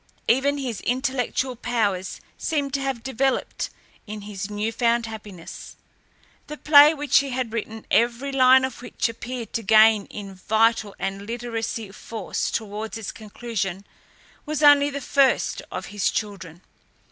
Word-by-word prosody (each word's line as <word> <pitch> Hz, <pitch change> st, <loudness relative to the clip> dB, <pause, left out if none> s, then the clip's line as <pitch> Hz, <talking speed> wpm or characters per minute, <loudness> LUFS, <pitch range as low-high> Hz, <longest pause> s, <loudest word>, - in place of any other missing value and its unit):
Even 275 Hz, +4 st, +3 dB
his 250 Hz, -6 st, -4 dB
intellectual 260 Hz, 0 st, -1 dB
powers 215 Hz, -6 st, -1 dB, 0.2 s
seemed 285 Hz, -4 st, -2 dB
to 275 Hz, -, 0 dB
have 270 Hz, -4 st, -3 dB
developed 265 Hz, +1 st, -1 dB, 0.4 s
in 210 Hz, 0 st, -6 dB
his 200 Hz, 0 st, -6 dB
new 210 Hz, +2 st, -2 dB
found 235 Hz, 0 st, +1 dB
happiness. 210 Hz, -6 st, -9 dB, 0.7 s
The 300 Hz, -, -7 dB
play 295 Hz, 0 st, +8 dB
which 290 Hz, -2 st, +3 dB
he 275 Hz, -, -3 dB
had 250 Hz, -3 st, -3 dB
written, 220 Hz, -1 st, -5 dB
every 240 Hz, +4 st, +2 dB
line 260 Hz, -1 st, +6 dB
of 255 Hz, -2 st, -7 dB
which 245 Hz, -, -2 dB
appeared 230 Hz, +1 st, -6 dB
to 230 Hz, -, -1 dB
gain 215 Hz, 0 st, +5 dB
in 200 Hz, -2 st, -8 dB
vital 220 Hz, +2 st, +1 dB
and 195 Hz, +1 st, -4 dB
literary 235 Hz, 0 st, -4 dB, 0.3 s
force 215 Hz, 0 st, -4 dB
towards 215 Hz, 0 st, -4 dB
its 220 Hz, -3 st, -5 dB
conclusion, 205 Hz, -3 st, -5 dB, 0.6 s
was 305 Hz, 0 st, -3 dB
only 290 Hz, -1 st, +7 dB
the 280 Hz, 0 st, -5 dB
first 275 Hz, 0 st, +2 dB
of -, -, -5 dB
his 205 Hz, -, +1 dB
children. 185 Hz, -5 st, -5 dB
230 Hz, 145 wpm, -24 LUFS, 210-265 Hz, 0.7 s, play